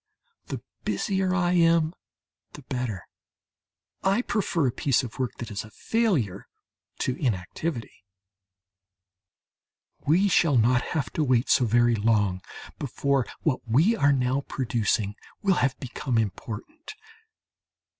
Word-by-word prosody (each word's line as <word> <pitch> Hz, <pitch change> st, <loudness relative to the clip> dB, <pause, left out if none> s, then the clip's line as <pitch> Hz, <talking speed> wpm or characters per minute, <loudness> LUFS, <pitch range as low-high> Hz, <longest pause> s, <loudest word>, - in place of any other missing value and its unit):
The -, -, -5 dB, 0.2 s
busier 190 Hz, -2 st, 0 dB
I 175 Hz, -1 st, +2 dB
am 165 Hz, -2 st, +4 dB, 0.6 s
the 145 Hz, -, -11 dB
better; 125 Hz, -7 st, -4 dB, 0.9 s
I 195 Hz, +5 st, +2 dB
prefer 175 Hz, -, 0 dB
a 125 Hz, -, +2 dB
piece 135 Hz, +2 st, +1 dB
of 125 Hz, +1 st, -8 dB
work 130 Hz, -3 st, -1 dB
that 120 Hz, -, -6 dB
is 100 Hz, -, -3 dB
a 110 Hz, -, -12 dB
failure 155 Hz, -, 0 dB, 0.5 s
to 130 Hz, -, 0 dB
inactivity. 115 Hz, -, -3 dB, 2.0 s
We 180 Hz, +7 st, +4 dB
shall 165 Hz, -7 st, +4 dB
not 120 Hz, +2 st, +4 dB
have 155 Hz, -3 st, -3 dB
to 155 Hz, -, +1 dB
wait 125 Hz, -3 st, +2 dB
so 130 Hz, -, +4 dB
very 120 Hz, +1 st, +4 dB
long 105 Hz, -4 st, +1 dB, 0.4 s
before 140 Hz, -1 st, 0 dB, 0.2 s
what 145 Hz, -5 st, +1 dB
we 155 Hz, -, +4 dB
are 145 Hz, -8 st, +4 dB
now 130 Hz, 0 st, +1 dB
producing 110 Hz, -5 st, 0 dB, 0.3 s
will 195 Hz, -2 st, +3 dB
have 135 Hz, +1 st, +1 dB
become 130 Hz, -1 st, -2 dB
important. 115 Hz, -, -4 dB
130 Hz, 125 wpm, -26 LUFS, 115-165 Hz, 2.0 s, am